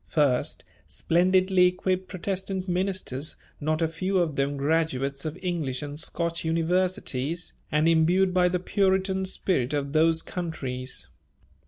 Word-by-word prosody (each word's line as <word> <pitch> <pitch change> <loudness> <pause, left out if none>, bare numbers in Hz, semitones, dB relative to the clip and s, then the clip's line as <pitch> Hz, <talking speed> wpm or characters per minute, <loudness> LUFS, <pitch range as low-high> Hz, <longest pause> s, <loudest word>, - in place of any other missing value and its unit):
First, 140 -5 +1 0.2
splendidly 185 +2 +3
equipped 185 +1 -1
Protestant 190 0 -3
ministers, 180 -6 -1 0.2
not 155 +2 0
a - - +3
few 185 +4 -1
of 165 -5 +1
them 140 +1 0
graduates 140 -2 0
of 155 +2 -4
English 155 -8 -2
and 145 0 -6
Scotch 170 +1 -2
universities 165 -2 0 0.2
and 150 +2 +3
imbued 175 +3 +3
by 180 -1 +4
the 180 0 0
Puritan 190 0 +1
spirit 150 -8 0
of 140 0 -2
those 160 +1 +4
countries. 135 -8 -4
165 Hz, 130 wpm, -26 LUFS, 150-185 Hz, 0.2 s, by